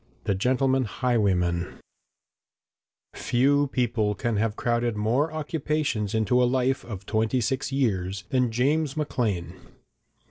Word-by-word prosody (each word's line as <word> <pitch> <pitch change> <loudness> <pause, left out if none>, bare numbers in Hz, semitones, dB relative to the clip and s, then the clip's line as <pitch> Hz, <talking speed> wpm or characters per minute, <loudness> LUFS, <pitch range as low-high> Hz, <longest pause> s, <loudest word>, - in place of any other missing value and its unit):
] - - -36
THE 105 - +1
GENTLEMAN 130 +5 +1
HIGHWAYMAN 95 -8 0 1.4
Few 140 +4 +2
people 115 -5 0
can 115 -2 -1
have 110 0 0
crowded 120 -2 0
more 125 +9 +1
occupations 150 -8 -2
into 110 +3 +2
a - - +5
life 130 +1 0
of 100 -4 -8
twenty 110 +4 0
six 130 +3 -1
years 95 -8 -1
than 125 -2 +2
James 140 +5 0
Maclean. 115 - -1
120 Hz, 120 wpm, -26 LUFS, 105-135 Hz, 1.4 s, a